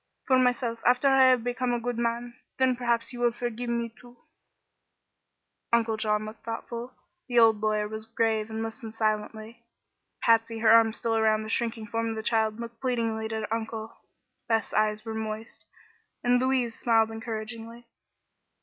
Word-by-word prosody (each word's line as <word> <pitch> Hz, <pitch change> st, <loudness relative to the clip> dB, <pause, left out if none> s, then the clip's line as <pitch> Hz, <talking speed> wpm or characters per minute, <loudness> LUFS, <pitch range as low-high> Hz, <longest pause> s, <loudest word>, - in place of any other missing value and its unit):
For 260 Hz, -1 st, +4 dB
myself, 245 Hz, -2 st, +1 dB
after 250 Hz, +3 st, +4 dB
I 270 Hz, -1 st, +6 dB
have 250 Hz, -3 st, +3 dB
become 245 Hz, 0 st, -1 dB
a 240 Hz, -, 0 dB
good 240 Hz, 0 st, -3 dB
man, 235 Hz, +1 st, -2 dB, 0.2 s
then 260 Hz, -1 st, +3 dB
perhaps 235 Hz, 0 st, -1 dB
you 240 Hz, -, -7 dB
will 240 Hz, -1 st, +3 dB
forgive 240 Hz, 0 st, -4 dB
me, 235 Hz, -1 st, -2 dB
too." 245 Hz, 0 st, -16 dB, 1.5 s
Uncle 230 Hz, -1 st, +2 dB
John 215 Hz, -1 st, 0 dB
looked 215 Hz, +1 st, -10 dB
thoughtful; 235 Hz, +2 st, -6 dB, 0.3 s
the 245 Hz, -1 st, -1 dB
old 225 Hz, -2 st, +6 dB
lawyer 215 Hz, -1 st, +1 dB
was 220 Hz, +1 st, -6 dB
grave 225 Hz, -1 st, 0 dB
and 220 Hz, 0 st, -3 dB
listened 225 Hz, 0 st, -7 dB
silently. 220 Hz, +1 st, -2 dB, 0.6 s
Patsy, 230 Hz, 0 st, +3 dB
her 220 Hz, 0 st, +3 dB
arms 225 Hz, 0 st, +6 dB
still 230 Hz, -1 st, 0 dB
around 220 Hz, -1 st, +2 dB
the 215 Hz, -, -7 dB
shrinking 225 Hz, -1 st, -1 dB
form 230 Hz, +2 st, -2 dB
of 225 Hz, -, -3 dB
the 220 Hz, -, -5 dB
child, 220 Hz, -1 st, +1 dB
looked 235 Hz, 0 st, -8 dB
pleadingly 230 Hz, -4 st, -1 dB
at 220 Hz, -, -4 dB
her 220 Hz, 0 st, -3 dB
uncle. 225 Hz, -1 st, -4 dB, 0.5 s
Beth's 225 Hz, -1 st, 0 dB
eyes 215 Hz, 0 st, +1 dB
were 225 Hz, -, -4 dB
moist 220 Hz, 0 st, -6 dB, 0.6 s
and 245 Hz, 0 st, +4 dB
Louise 255 Hz, -3 st, +1 dB
smiled 225 Hz, -2 st, +2 dB
encouragingly. 225 Hz, +1 st, -6 dB
230 Hz, 165 wpm, -27 LUFS, 220-240 Hz, 1.5 s, I